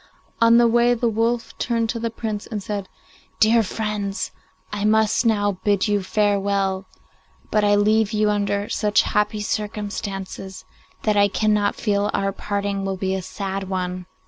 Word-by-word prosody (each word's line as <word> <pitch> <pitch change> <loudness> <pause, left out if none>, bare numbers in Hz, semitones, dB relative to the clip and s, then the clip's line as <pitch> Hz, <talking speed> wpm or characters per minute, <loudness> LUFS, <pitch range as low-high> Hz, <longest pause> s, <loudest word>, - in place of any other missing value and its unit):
On 230 0 +7
the 240 0 +6
way 240 +1 +4
the 235 0 0
wolf 230 +1 0
turned 230 -1 0
to 230 - -2
the 230 0 -1
Prince 215 -2 -4
and 210 -4 -5
said, 200 -2 -4 0.5
'Dear 225 +2 +5
friends, 210 -1 -3 0.4
I 205 -1 -2
must 220 +2 +3
now 205 -3 +1
bid 205 0 +2
you 205 -1 +1
farewell, 200 -1 0 0.6
but 210 - +2
I 205 0 +4
leave 215 +1 +3
you 210 -1 +2
under 205 0 -1
such 210 -1 +2
happy 210 0 0
circumstances 205 -3 -4 0.4
that 210 -1 +2
I 205 0 +5
cannot 210 0 +1
feel 205 -1 0
our 195 0 0
parting 200 0 -3
to 195 -1 -2
be 190 0 -1
a 190 - -2
sad 195 +1 -5
one. 180 -1 -3
205 Hz, 160 wpm, -22 LUFS, 195-220 Hz, 0.6 s, On